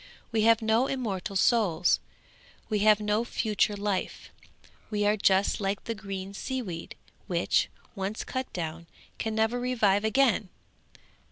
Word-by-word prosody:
We 225 -1 +1
have 230 0 +5
no 225 +4 +3
immortal 205 -7 -3
souls; 190 -5 +3 0.7
we 215 -2 +1
have 210 0 +5
no 210 +1 +1
future 210 -3 0
life; 200 -2 -3 0.6
we 210 -1 0
are 210 +1 +4
just 195 0 +2
like 195 0 -1
the 230 - -3
green 195 -2 -6
sea 260 +6 -3
weed, 170 -5 -7 0.3
which, - - +1 0.2
once 200 +1 -3
cut 260 0 -4
down, 165 -1 -5 0.3
can 220 -1 -2
never 220 +2 +1
revive 220 -5 +2
again! 220 -3 +2
210 Hz, 140 wpm, -28 LUFS, 195-225 Hz, 0.7 s, have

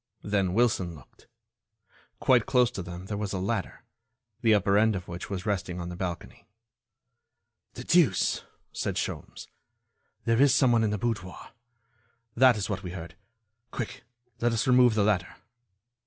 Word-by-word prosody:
Then 100 -3 0
Wilson 105 -8 +1
looked. - - -19 0.9
Quite - - +3
close 125 -3 +3
to 95 - -5
them 90 +1 -8
there 105 +1 -4
was 105 -2 -3
a - - -1
ladder, 95 +2 -3 0.6
the 110 -2 +5
upper 100 0 +2
end 110 +1 +4
of 90 -1 -6
which 85 +1 -7
was 95 -1 -4
resting 95 -4 -2
on 85 0 -5
the 90 - -6
balcony. 90 -2 -6 1.3
"The - - -7
deuce!" - - +2 0.3
said - - -3
Sholmes, - - -5 0.8
"there 115 +1 +3
is 140 -1 +5
someone 120 -4 +4
in 110 - +1
the 105 - -1
boudoir. 95 -4 -4 0.8
That 125 -1 +5
is 100 - -2
what 100 -3 -3
we 90 -2 -7
heard. 85 -2 -8 0.6
Quick, 120 - -6 0.4
let 120 0 +1
us 115 - 0
remove 125 -3 +5
the 105 - +3
ladder." 100 -4 0
100 Hz, 155 wpm, -27 LUFS, 90-115 Hz, 1.3 s, the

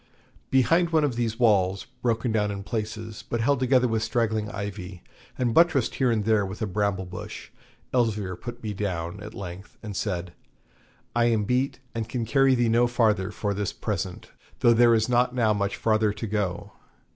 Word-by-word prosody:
Behind 165 +7 +3
one 160 -2 +3
of 140 -5 0
these 115 -2 -1
walls, 100 -5 +2 0.2
broken 115 0 0
down 105 -1 +1
in 100 -1 -5
places, 110 0 -5
but 120 - -1
held 135 +4 +2
together 130 -1 +3
with 110 -2 0
straggling 110 -2 0
ivy, 100 -3 -6 0.3
and 120 -2 0
buttressed 165 -6 +4
here 130 -2 +1
and 110 -3 0
there 110 -2 +3
with 95 +1 -6
a 110 - -1
bramble 100 -1 -1
bush, 90 0 -8 0.4
Elzevir 105 -7 0
put 120 +5 -8
me 105 -1 -3
down 95 -2 -3
at 105 +2 -9
length 95 0 -8
and 105 -3 -6
said, 90 -4 -3 0.8
'I 120 0 +3
am 115 -3 +2
beat, 130 +5 0
and 115 -1 -4
can 120 -2 -2
carry 135 +3 +4
thee 120 -1 +2
no 120 +2 +4
farther 110 -5 +2
for 105 0 -2
this 100 -1 -2
present, - - -4 0.3
though 120 - +6
there 120 0 +5
is 110 0 +1
not 125 0 +2
now 110 -3 +3
much 100 -1 -1
farther 110 -1 +2
to 105 +2 -5
go. 100 -4 -2
110 Hz, 185 wpm, -26 LUFS, 100-120 Hz, 0.8 s, though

